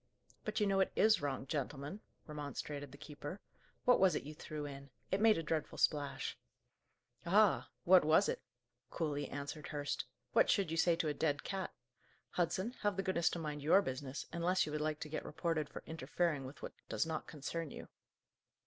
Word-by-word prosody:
"But 215 Hz, 0 st, -1 dB
you 210 Hz, -, +3 dB
know 195 Hz, -1 st, +2 dB
it 190 Hz, -, +3 dB
is 215 Hz, -3 st, +5 dB
wrong, 135 Hz, -2 st, -2 dB
gentlemen," 145 Hz, +6 st, -3 dB, 0.2 s
remonstrated 145 Hz, -1 st, -5 dB
the 140 Hz, -, -11 dB
keeper. 150 Hz, +5 st, -7 dB, 0.5 s
"What 250 Hz, -, +6 dB
was 190 Hz, -1 st, +5 dB
it -, -, -1 dB
you 150 Hz, +2 st, -7 dB
threw 150 Hz, 0 st, -5 dB
in? 140 Hz, -1 st, -8 dB, 0.2 s
It 190 Hz, +2 st, +2 dB
made 220 Hz, -1 st, +6 dB
a 165 Hz, -, -2 dB
dreadful 155 Hz, -1 st, -2 dB
splash." 145 Hz, -2 st, +1 dB, 0.9 s
"Ah! 200 Hz, +3 st, +4 dB
what 185 Hz, 0 st, +7 dB
was 160 Hz, +6 st, +5 dB
it?" -, -, -1 dB, 0.5 s
coolly 145 Hz, -3 st, -2 dB
answered 145 Hz, +2 st, -5 dB
Hurst. 145 Hz, -1 st, -2 dB, 0.3 s
"What -, -, +5 dB
should 195 Hz, -6 st, +3 dB
you 165 Hz, -, -1 dB
say 170 Hz, 0 st, +4 dB
to 165 Hz, -1 st, 0 dB
a 150 Hz, -, +1 dB
dead 145 Hz, 0 st, 0 dB
cat? 190 Hz, -1 st, -3 dB, 0.6 s
Hudson, 185 Hz, +5 st, 0 dB
have 205 Hz, -2 st, +1 dB
the 195 Hz, -, 0 dB
goodness 185 Hz, -3 st, +2 dB
to -, -, -3 dB
mind 150 Hz, -3 st, -4 dB
your 170 Hz, +7 st, +5 dB
business, 130 Hz, -2 st, -4 dB
unless 180 Hz, +2 st, +2 dB
you 150 Hz, -, -5 dB
would 150 Hz, 0 st, -1 dB
like 155 Hz, 0 st, -1 dB
to -, -, -3 dB
get 155 Hz, -, -3 dB
reported 155 Hz, -1 st, -1 dB
for -, -, -8 dB
interfering 160 Hz, -1 st, -1 dB
with 135 Hz, +3 st, -10 dB
what -, -, -5 dB, 0.2 s
does -, -, +1 dB
not 160 Hz, -1 st, -3 dB
concern 155 Hz, +2 st, -4 dB
you." -, -, -8 dB
155 Hz, 190 wpm, -36 LUFS, 145-185 Hz, 0.9 s, what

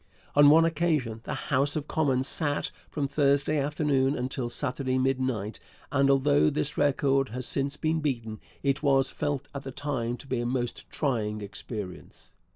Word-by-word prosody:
On 145 Hz, 0 st, +8 dB
one 165 Hz, +2 st, +7 dB
occasion 155 Hz, -9 st, 0 dB
the -, -, -3 dB
House 140 Hz, +2 st, +1 dB
of 150 Hz, -1 st, -3 dB
Commons 135 Hz, -4 st, +1 dB
sat 145 Hz, -3 st, 0 dB, 0.2 s
from 145 Hz, -2 st, -2 dB
Thursday 140 Hz, +1 st, +2 dB
afternoon 140 Hz, -1 st, +1 dB
until 125 Hz, -1 st, -3 dB
Saturday 130 Hz, 0 st, -1 dB
midnight, 130 Hz, -5 st, -1 dB, 0.3 s
and 140 Hz, -1 st, +3 dB
although 75 Hz, -, +4 dB
this 75 Hz, -, -1 dB
record 135 Hz, -1 st, +2 dB
has 125 Hz, +2 st, -4 dB
since 140 Hz, +2 st, -2 dB
been 160 Hz, 0 st, 0 dB
beaten, 115 Hz, -8 st, -3 dB, 0.2 s
it 140 Hz, 0 st, +1 dB
was 135 Hz, -2 st, +3 dB
felt 145 Hz, -2 st, -2 dB
at 140 Hz, -, -5 dB
the 135 Hz, -, -7 dB
time 130 Hz, -4 st, -3 dB
to -, -, -13 dB
be 130 Hz, -3 st, -2 dB
a -, -, -2 dB
most 120 Hz, -1 st, -3 dB
trying 110 Hz, -7 st, -1 dB
experience. 100 Hz, -1 st, -7 dB
135 Hz, 160 wpm, -28 LUFS, 125-145 Hz, 0.3 s, On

